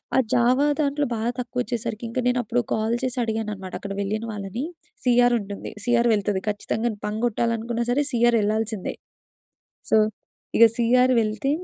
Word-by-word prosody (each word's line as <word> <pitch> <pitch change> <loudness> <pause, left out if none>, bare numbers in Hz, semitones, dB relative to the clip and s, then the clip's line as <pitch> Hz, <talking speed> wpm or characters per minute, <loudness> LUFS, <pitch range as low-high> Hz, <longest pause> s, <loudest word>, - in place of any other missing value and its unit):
ఆ - - +4 0.2
జావా 250 +4 +4 0.2
దాంట్లో 285 0 +1
బాగా 225 +2 -1
తక్కువ 245 0 -3
వచ్చేసరికి 235 -2 -4
ఇంకా 245 - -2
నేను 250 0 +2
అప్పుడు 235 +3 0
కాల్ 220 +1 0
చేసి 255 0 -1
అడిగాను 220 -1 -2
అనమాట 190 -2 -9
అక్కడ 200 -1 -5
వెళ్ళిన 215 +3 -2
వాళ్ళని. 205 +4 -5 0.4
సి 250 - +3
ఆర్ 245 - +3
ఉంటుంది. 200 0 -7
సి 240 - -3
ఆర్ 235 - +3
వెళ్తది 205 -2 0
ఖచ్చితంగా. 220 +3 -1 0.2
బంక్ 210 +1 -3
కొట్టాలనుకున్నా 235 0 -1
సరే, 280 +4 +2
సి 240 - 0
ఆర్ 235 - +3
ఎళ్ళాల్సిందే. 215 -1 -1 1.0
సో, - - +5 0.6
ఇక 230 - +8
సి 235 - +1 0.2
ఆర్ 255 0 +4
వెళ్తే 215 +4 -1
230 Hz, 175 wpm, -24 LUFS, 215-245 Hz, 1.0 s, ఇక